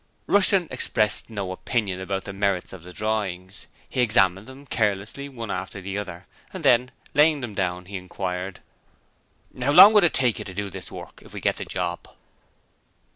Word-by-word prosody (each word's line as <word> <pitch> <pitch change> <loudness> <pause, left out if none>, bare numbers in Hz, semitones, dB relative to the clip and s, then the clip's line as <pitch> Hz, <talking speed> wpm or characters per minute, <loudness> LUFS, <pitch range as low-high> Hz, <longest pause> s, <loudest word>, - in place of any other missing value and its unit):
Rushton 195 -3 +5
expressed 110 -4 +1
no 100 -4 -4
opinion 95 -1 -2
about 95 0 -3
the 100 - -7
merits 95 -2 -1
of 95 - -10
the 90 +2 -12
drawings. 100 -3 -4 0.2
He 130 - -1
examined 100 -4 +2
them 135 +2 -12
carelessly 110 +3 -2
one 115 -6 -6
after 95 +2 -5
the 95 +1 -6
other, 95 -2 -8 0.3
and 185 -5 -7
then, 125 -1 +4 0.2
laying 150 0 +4
them 120 -4 -5
down, 90 -2 -2
he 100 +1 -6
inquired: 90 0 -5 1.0
'How 135 +3 +2
long 205 +8 +10
would 210 -3 +6
it 170 - +2
take 125 -4 +1
you - - -6
to 95 - -9
do 100 0 -4
this - - -8
work - - -10
if - - -13
we - - -4
get - - 0
the - - -5
job?' 90 -1 -4
100 Hz, 180 wpm, -24 LUFS, 95-125 Hz, 1.0 s, long